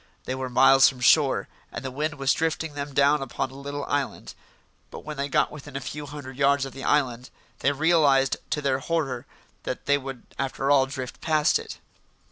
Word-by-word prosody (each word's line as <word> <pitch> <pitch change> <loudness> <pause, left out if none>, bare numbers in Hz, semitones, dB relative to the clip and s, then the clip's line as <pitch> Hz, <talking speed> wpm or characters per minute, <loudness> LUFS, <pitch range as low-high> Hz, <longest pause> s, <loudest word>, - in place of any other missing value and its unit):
They 130 - -2
were 130 0 -4
miles 135 +2 +6
from 130 - -10
shore, 135 +2 +4 0.2
and - - -7
the 130 - -3
wind 150 +3 -2
was 135 -1 +2
drifting 160 -1 -2
them 145 0 -5
down 140 +1 +4
upon 130 0 -3
a - - -13
little 140 +1 -5
island. 140 -1 -3 0.6
But - - -9
when 155 0 -5
they 140 0 -3
got - - +2
within 145 -2 -10
a - - -1
few 145 +2 -6
hundred 140 -3 -9
yards 140 0 +3
of 135 - -8
the 135 - -8
island, 125 -4 0 0.3
they 140 - +2
realised 145 -3 +3
to 150 -2 -2
their 135 -1 +1
horror 135 -5 -2 0.3
that - - -5
they 145 0 +3
would 135 -3 -8 0.2
after 135 +1 -1
all 135 -2 +5
drift 130 -2 -7
past 155 - +2
it. 455 -1 -8
140 Hz, 200 wpm, -25 LUFS, 135-150 Hz, 0.6 s, miles